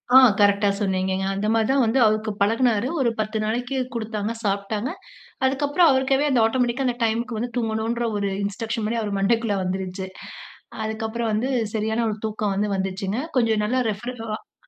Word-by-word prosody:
ஆ -, -, +12 dB, 0.2 s
கரெக்ட்டா 200 Hz, 0 st, +4 dB
சொன்னீங்கங்க. 190 Hz, -1 st, 0 dB
அந்த 200 Hz, +2 st, -2 dB
மாரி 225 Hz, -1 st, +2 dB
தான் 270 Hz, -1 st, +3 dB
வந்து 230 Hz, +4 st, +2 dB
அவருக்கு 215 Hz, 0 st, +1 dB
பழகுனாரு. 225 Hz, +2 st, +2 dB
ஒரு 240 Hz, -, +3 dB
10 215 Hz, +1 st, -1 dB
நாளைக்கு 245 Hz, +5 st, -2 dB, 0.2 s
குடுத்தாங்க 220 Hz, -1 st, -3 dB
சாப்பிட்டாங்க. 205 Hz, +4 st, -1 dB, 0.6 s
அதுக்கப்புறம் 290 Hz, +5 st, +3 dB
அவருக்காவே 265 Hz, +2 st, +2 dB
அந்த 245 Hz, -, +4 dB
ஆட்டோமேட்டிக்கா 250 Hz, +2 st, 0 dB
அந்த 245 Hz, -, 0 dB
டைம்க்கு 230 Hz, +1 st, -1 dB
வந்து, 240 Hz, +2 st, -3 dB
தூங்கணுன்ற 225 Hz, +1 st, -1 dB
ஒரு 200 Hz, -1 st, -1 dB
இன்ஸ்ட்ரக்ஷன் 220 Hz, +2 st, -3 dB
மாரி 230 Hz, +1 st, -1 dB
அவர் 205 Hz, -2 st, -2 dB
மண்டைக்குள்ள 220 Hz, +1 st, +1 dB
வந்துருச்சு. 190 Hz, 0 st, -3 dB, 0.8 s
அதுக்கப்புறம் 220 Hz, +1 st, -2 dB
வந்து 230 Hz, +5 st, 0 dB, 0.3 s
சரியான 220 Hz, +2 st, 0 dB
ஒரு 215 Hz, -, -3 dB
தூக்கம் 210 Hz, -2 st, -1 dB
வந்து 205 Hz, +1 st, 0 dB
வந்துச்சுங்க. 195 Hz, +2 st, -2 dB, 0.2 s
கொஞ்சம் 225 Hz, -3 st, +2 dB
நல்லா 255 Hz, +3 st, +1 dB
ரெஃப்ரிர 240 Hz, +5 st, -6 dB, 0.2 s
அ -, -, -26 dB
220 Hz, 160 wpm, -23 LUFS, 205-240 Hz, 0.8 s, ஆ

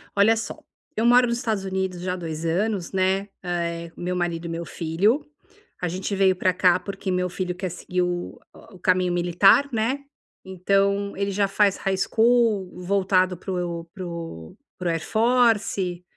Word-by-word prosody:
Olha 205 Hz, +3 st, +5 dB
só, 225 Hz, -, -5 dB, 0.4 s
eu 220 Hz, -, +1 dB
moro 245 Hz, +1 st, +6 dB
nos 235 Hz, 0 st, -1 dB
Estados 220 Hz, -5 st, -2 dB
Unidos 190 Hz, -2 st, -2 dB
já 180 Hz, 0 st, -2 dB
há -, -, -2 dB
2 165 Hz, -2 st, -5 dB
anos, 190 Hz, +2 st, -1 dB
né, 190 Hz, +1 st, +1 dB
eh, 170 Hz, -1 st, -3 dB
com -, -, -11 dB
meu 180 Hz, +1 st, -2 dB
marido 175 Hz, -1 st, -2 dB
e -, -, -5 dB
meu 165 Hz, +1 st, -4 dB
filho. 195 Hz, -, 0 dB, 0.6 s
A 180 Hz, -, 0 dB
gente 185 Hz, +3 st, -3 dB
veio 190 Hz, -1 st, +4 dB
pra 185 Hz, 0 st, +1 dB
cá 180 Hz, 0 st, +4 dB
porque 195 Hz, +1 st, -6 dB
meu 180 Hz, 0 st, 0 dB
filho 180 Hz, 0 st, -3 dB
quer 185 Hz, 0 st, -4 dB
seguir 180 Hz, +1 st, -3 dB
o 175 Hz, 0 st, -3 dB, 0.3 s
o 185 Hz, -, -14 dB
caminho 180 Hz, -1 st, +2 dB
militar, 175 Hz, +10 st, +4 dB
né. 230 Hz, +5 st, 0 dB, 0.5 s
Então 200 Hz, +2 st, 0 dB
ele 200 Hz, 0 st, -1 dB
já 200 Hz, +1 st, +1 dB
faz 195 Hz, 0 st, +2 dB
high-school 215 Hz, +1 st, +2 dB
voltado 185 Hz, -1 st, +2 dB
pro 175 Hz, -2 st, -4 dB
pro 170 Hz, -, -7 dB, 0.2 s
pro 180 Hz, -1 st, -2 dB
Air 165 Hz, -1 st, -2 dB
Force 220 Hz, -6 st, +2 dB
185 Hz, 165 wpm, -24 LUFS, 175-200 Hz, 0.6 s, moro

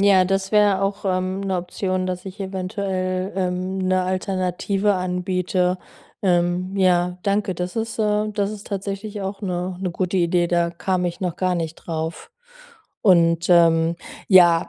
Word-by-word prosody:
ja, 195 Hz, -2 st, +5 dB
das 195 Hz, +1 st, -1 dB
wäre 205 Hz, -2 st, +4 dB
auch, 195 Hz, +1 st, -2 dB
ähm, 185 Hz, 0 st, -1 dB
'ne 190 Hz, -1 st, -1 dB
Option, 185 Hz, +1 st, -2 dB
dass 180 Hz, 0 st, -4 dB
ich 195 Hz, +1 st, -9 dB
eventuell, 185 Hz, 0 st, -2 dB
ähm, 185 Hz, 0 st, -1 dB
'ne 185 Hz, 0 st, +1 dB
Alternative 185 Hz, +2 st, 0 dB
anbiete. 180 Hz, 0 st, 0 dB, 0.4 s
Ähm, 180 Hz, 0 st, +1 dB
ja, 180 Hz, -2 st, +2 dB
danke. 200 Hz, -1 st, 0 dB
Das 180 Hz, +3 st, -4 dB
ist, 225 Hz, 0 st, -3 dB
äh 210 Hz, 0 st, +1 dB
das 205 Hz, -1 st, -1 dB
ist 210 Hz, -1 st, -8 dB
tatsächlich 200 Hz, +1 st, -4 dB
auch 195 Hz, +1 st, -4 dB
'ne 180 Hz, -1 st, -3 dB
'ne 185 Hz, -2 st, -1 dB
gute 185 Hz, +1 st, -1 dB
Idee. 175 Hz, 0 st, +2 dB
Da 170 Hz, -1 st, +1 dB
kam 180 Hz, +1 st, -1 dB
ich 175 Hz, -1 st, -3 dB
noch 180 Hz, -3 st, -2 dB
gar 185 Hz, -1 st, +1 dB
nicht 165 Hz, -2 st, -3 dB
drauf. 160 Hz, -, -5 dB, 0.7 s
Und, 170 Hz, -3 st, +4 dB
ähm, 165 Hz, -1 st, +4 dB, 0.3 s
ja, 175 Hz, -4 st, +6 dB
185 Hz, 155 wpm, -22 LUFS, 180-195 Hz, 0.7 s, ja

